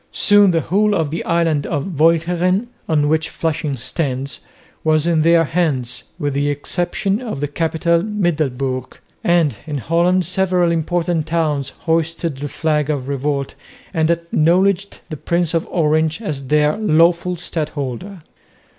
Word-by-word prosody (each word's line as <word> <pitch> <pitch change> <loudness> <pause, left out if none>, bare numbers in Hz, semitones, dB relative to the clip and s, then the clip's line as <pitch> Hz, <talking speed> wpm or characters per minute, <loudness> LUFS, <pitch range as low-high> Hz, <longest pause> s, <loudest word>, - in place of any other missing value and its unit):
Soon 205 -1 +5
the 165 -2 +2
whole 205 +4 +1
of 160 -5 -1
the 165 - -3
island 165 -4 +1
of 150 +1 -3
Walcheren, 175 +6 +2 0.2
on 150 -2 +2
which 160 +1 +1
Flushing 155 -3 -2
stands, 135 +1 -3 0.4
was 155 0 +2
in 170 -2 +2
their 165 +1 +5
hands 140 -7 -1
with 145 -1 -2
the 145 +1 0
exception 175 - -1
of 225 - -5
the 145 - -1
capital 165 +2 0
Middelburg; 145 - -2 0.3
and 165 -9 +2
in 150 -2 -3
Holland 170 +6 +1
several 180 -2 +1
important 170 0 -1
towns 150 -5 0
hoisted 165 -2 -1
the 145 +1 -4
flag 150 0 0
of 140 -4 -2
revolt 140 0 -2 0.4
and 160 -2 +1
acknowledged 175 +4 +1
the 155 - -4
Prince 170 +2 -1
of 165 0 0
Orange 155 0 +1
as 145 - -5
their 150 +1 +2
lawful 175 -2 +2
Stadholder. 155 - -5
160 Hz, 140 wpm, -19 LUFS, 145-175 Hz, 0.4 s, Soon